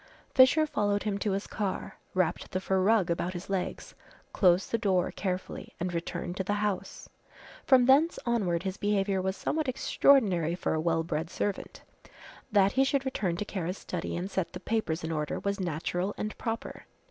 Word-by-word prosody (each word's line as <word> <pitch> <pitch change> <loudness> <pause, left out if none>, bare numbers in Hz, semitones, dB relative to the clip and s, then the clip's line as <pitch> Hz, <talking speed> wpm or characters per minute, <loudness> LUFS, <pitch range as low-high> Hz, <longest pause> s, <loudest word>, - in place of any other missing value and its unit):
Fisher 265 +4 +6
followed 205 -7 0
him 205 -2 -1
to 200 -1 0
his 200 +1 -2
car, 200 -3 -4 0.2
wrapped 180 -2 0
the 185 - -2
fur 190 0 0
rug 200 -3 +3
about 175 +2 -1
his 180 +2 -7
legs, 190 -2 -3 0.4
closed 180 -1 +3
the 230 - +2
door 190 -5 +1
carefully 185 -2 -4
and 180 0 -2
returned 170 +1 -4
to 190 - -2
the 205 +2 -1
house. 205 -2 -3 0.6
From 255 -3 +6
thence 285 +6 +4
onward 190 -8 0
his 190 -1 -3
behaviour 195 -2 +1
was 190 +1 -2
somewhat 310 -2 -1
extraordinary 200 - +3
for - - -1
a 160 - 0
well 165 0 +1
bred 160 0 -3
servant. 205 +2 -4 0.7
That 200 -2 +4
he 265 +4 +3
should 270 0 0
return 190 -10 -1
to 210 - -3
Kara's 185 -2 -3
study 175 -1 -4
and 185 +3 -4
set 190 -3 -2
the - - -6
papers 180 -8 -1
in 160 - -3
order 150 -2 -2
was 200 0 -2
natural 175 +3 -2
and 215 - -4
proper. 225 -1 -5
195 Hz, 180 wpm, -29 LUFS, 175-210 Hz, 0.7 s, Fisher